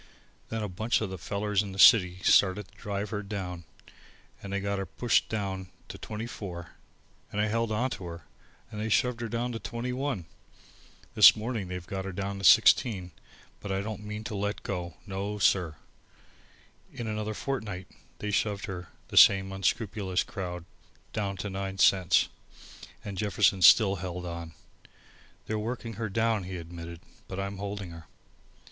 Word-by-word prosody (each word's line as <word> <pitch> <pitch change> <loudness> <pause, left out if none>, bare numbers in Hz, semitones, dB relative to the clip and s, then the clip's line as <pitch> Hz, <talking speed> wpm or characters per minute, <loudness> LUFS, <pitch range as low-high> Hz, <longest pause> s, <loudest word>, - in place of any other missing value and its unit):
Then 110 -1 -3
a - - -1
bunch 110 +6 0
of 105 -4 -2
these 95 - -6
fellers 100 +3 0
in 100 -2 -6
the - - -9
city 90 -5 +7
started 95 0 +4
to - - -25
drive 100 0 -4
her 105 -2 -2
down 95 -4 -5 0.8
and 100 - -7
they 100 - 0
got 100 0 -2
her 95 - -2
pushed 120 +7 +1
down 95 -3 -3 0.2
to - - -8
twenty 110 +1 -5
four, 90 -7 -7 0.6
and 105 - -3
I 105 - +3
held 115 0 0
on 125 +4 0
to 95 - -6
her 85 -1 -8 0.5
and 105 - -5
they 110 - -2
shoved 120 +2 +2
her 115 - -3
down 120 +2 -2
to 115 - -4
twenty 120 +1 -4
one. 130 - -2 0.9
This - - +9
morning 110 -3 -3
they've 90 -1 -6
got 95 +1 -4
her 95 - -4
down 100 +2 -4
to - - -8
sixteen, 95 -2 +5 0.5
but 100 - -6
I 95 0 0
don't 105 0 -5
mean 105 +1 -5
to 110 - -5
let 105 +1 -2
go. 90 -3 -4
No, 100 +1 -4
sir." 90 -5 +2 1.2
In 120 - -6
another 110 0 -3
fortnight 105 -10 -4 0.3
they 105 - -3
shoved 100 -1 0
her, 90 -2 -6 0.2
the - - -4
same 95 0 +7
unscrupulous 95 -1 0
crowd, 90 -3 -6 0.5
down 100 -2 -2
to 100 - -4
nine 95 0 -4
cents, 95 -2 +4 0.8
and 100 -3 -5
Jefferson 100 -2 +2
still 100 +2 +7
held 90 0 -5
on. 85 -2 -6 0.9
"They're 110 0 -2
working 115 +1 -4
her 110 - -1
down," 110 -1 +1
he 95 0 -5
admitted, 85 0 -8 0.3
"but 95 - -5
I'm 100 0 -4
holding 100 -3 -5
her." 80 -1 -11
100 Hz, 175 wpm, -29 LUFS, 95-110 Hz, 1.2 s, This